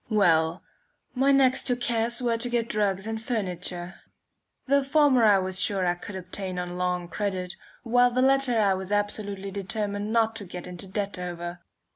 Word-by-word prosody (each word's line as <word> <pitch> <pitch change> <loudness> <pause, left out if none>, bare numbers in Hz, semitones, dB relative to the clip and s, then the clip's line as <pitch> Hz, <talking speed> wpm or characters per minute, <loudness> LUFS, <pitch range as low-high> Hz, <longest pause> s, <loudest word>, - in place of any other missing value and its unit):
Well, 170 -5 +3 0.5
my 270 +2 +3
next 265 -1 +4
two 250 - +2
cares 235 0 -1
were 235 -1 +2
to 230 +2 -1
get 235 -1 0
drugs 200 -3 0
and 220 0 -4
furniture. 180 -5 -3 0.6
The 280 +1 +3
former 275 -3 +4
I 210 -2 +6
was 185 0 -1
sure 195 -2 +1
that 175 - +3
I - - 0
could 185 +3 -9
obtain 185 0 -5
on 180 0 -4
long 180 -1 -1
credit; 185 -1 -3 0.3
while 245 +1 +4
the 255 +1 +1
latter 270 -3 +3
I 200 -2 +3
was 190 +1 -5
absolutely 205 -1 -2
determined 205 +1 -3
not 225 -1 +2
to 205 - -4
get 180 -1 -8
into 180 +1 -7
debt 200 0 -3
over. 175 0 -5
205 Hz, 180 wpm, -26 LUFS, 180-235 Hz, 0.6 s, I